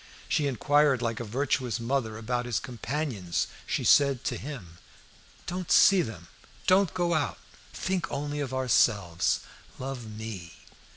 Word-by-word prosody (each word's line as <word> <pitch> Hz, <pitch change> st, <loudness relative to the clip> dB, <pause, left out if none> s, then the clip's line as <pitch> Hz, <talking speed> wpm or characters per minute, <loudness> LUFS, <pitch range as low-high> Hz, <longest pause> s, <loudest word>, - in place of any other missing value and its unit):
She 145 Hz, -, +1 dB
inquired 140 Hz, 0 st, +3 dB
like 115 Hz, -1 st, -1 dB
a -, -, -3 dB
virtuous 125 Hz, +1 st, -1 dB
mother 115 Hz, -2 st, -1 dB
about 120 Hz, +2 st, -2 dB
his 120 Hz, -4 st, 0 dB
companions. 125 Hz, -, -2 dB, 0.2 s
She -, -, -1 dB
said 140 Hz, -3 st, +4 dB
to -, -, -1 dB
him 110 Hz, -, -8 dB, 0.7 s
"Don't 180 Hz, -1 st, -4 dB
see 195 Hz, -2 st, +7 dB
them; 105 Hz, -, -6 dB, 0.4 s
don't 185 Hz, 0 st, +4 dB
go 175 Hz, -1 st, +1 dB
out; 155 Hz, -3 st, 0 dB, 0.3 s
think 185 Hz, -2 st, -2 dB
only 145 Hz, +1 st, -3 dB
of 140 Hz, -3 st, -3 dB
ourselves; 105 Hz, -9 st, +2 dB, 0.4 s
love 130 Hz, -3 st, -5 dB
me!" 105 Hz, -6 st, -7 dB
130 Hz, 135 wpm, -28 LUFS, 110-145 Hz, 0.7 s, see